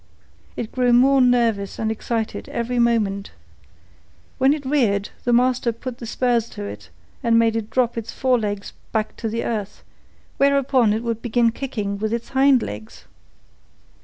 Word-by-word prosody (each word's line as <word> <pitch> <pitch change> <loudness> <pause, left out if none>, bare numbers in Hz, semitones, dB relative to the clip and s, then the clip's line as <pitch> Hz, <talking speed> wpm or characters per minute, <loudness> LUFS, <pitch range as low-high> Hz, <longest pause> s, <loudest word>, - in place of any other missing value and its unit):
It 225 - -4
grew 250 -1 +2
more 265 +2 +5
nervous 235 -5 +2
and 220 -1 -1
excited 225 0 -3
every 240 +1 -2
moment. 210 -4 +1 1.1
When 265 +1 +5
it 295 -2 -2
reared, 225 -8 +1 0.2
the 240 - +2
master 245 0 +3
put 240 +2 -7
the 235 - -7
spurs 240 -1 0
to - - -4
it 100 -4 -8 0.3
and 230 -1 +3
made 230 -1 +3
it 225 -1 -3
drop 240 -2 +1
its 225 - -7
fore 255 -2 +1
legs 205 -2 -4 0.2
back 220 -1 -1
to 230 0 -3
earth, 210 -3 -4 0.5
whereupon 275 -4 +3
it 220 +2 -2
would 230 -1 -2
begin 235 -1 +2
kicking 215 -6 -4
with 215 +1 -1
its 235 0 -3
hind 270 -2 +4
legs. 105 +1 -8
235 Hz, 160 wpm, -22 LUFS, 215-250 Hz, 1.1 s, more